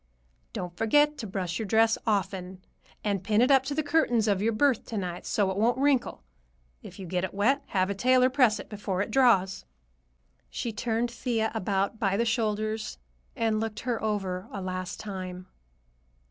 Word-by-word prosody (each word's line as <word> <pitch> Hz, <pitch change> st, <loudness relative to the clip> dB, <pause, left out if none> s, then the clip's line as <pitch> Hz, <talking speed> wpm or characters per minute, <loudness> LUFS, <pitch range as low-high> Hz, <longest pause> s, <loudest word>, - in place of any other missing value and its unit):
"Don't 175 Hz, -1 st, -5 dB
forget 295 Hz, +8 st, +3 dB
to 220 Hz, -, -4 dB
brush 185 Hz, -3 st, -3 dB
your 220 Hz, -, -3 dB
dress 225 Hz, +2 st, +4 dB
often, 190 Hz, -3 st, -2 dB, 0.4 s
and 200 Hz, -3 st, -1 dB
pin 210 Hz, +2 st, +2 dB
it 250 Hz, +4 st, +4 dB
up 270 Hz, -1 st, +6 dB
to 285 Hz, +1 st, -3 dB
the 310 Hz, -, 0 dB
curtains 285 Hz, -7 st, +2 dB
of 200 Hz, -2 st, +2 dB
your 225 Hz, +2 st, +2 dB
berth 255 Hz, +2 st, +2 dB
to 225 Hz, -, -5 dB
night, 180 Hz, -2 st, -4 dB
so 200 Hz, -3 st, +1 dB
it 190 Hz, -, -4 dB
won't 235 Hz, +4 st, +2 dB
wrinkle. 270 Hz, -, +1 dB, 0.6 s
If -, -, -11 dB
you 190 Hz, -, -7 dB
get 180 Hz, +1 st, -2 dB
it 190 Hz, -, -4 dB
wet, 255 Hz, +8 st, +2 dB
have 190 Hz, 0 st, 0 dB
a -, -, 0 dB
tailor 255 Hz, +5 st, +3 dB
press 250 Hz, -6 st, +3 dB
it -, -, -8 dB
before 200 Hz, -2 st, -2 dB
it -, -, -8 dB
draws." 230 Hz, -8 st, +3 dB, 0.9 s
She 235 Hz, -, -4 dB
turned 235 Hz, +2 st, -1 dB
Thea 230 Hz, -2 st, -1 dB
about 200 Hz, 0 st, -1 dB
by 195 Hz, -2 st, +1 dB
the 235 Hz, -, +1 dB
shoulders 215 Hz, -1 st, -1 dB, 0.4 s
and 225 Hz, -3 st, +1 dB
looked 220 Hz, -1 st, -4 dB
her 240 Hz, -2 st, -2 dB
over 195 Hz, -3 st, -2 dB
a 200 Hz, -, -5 dB
last 185 Hz, -1 st, -4 dB
time. 185 Hz, -3 st, -6 dB
215 Hz, 185 wpm, -28 LUFS, 190-235 Hz, 0.9 s, up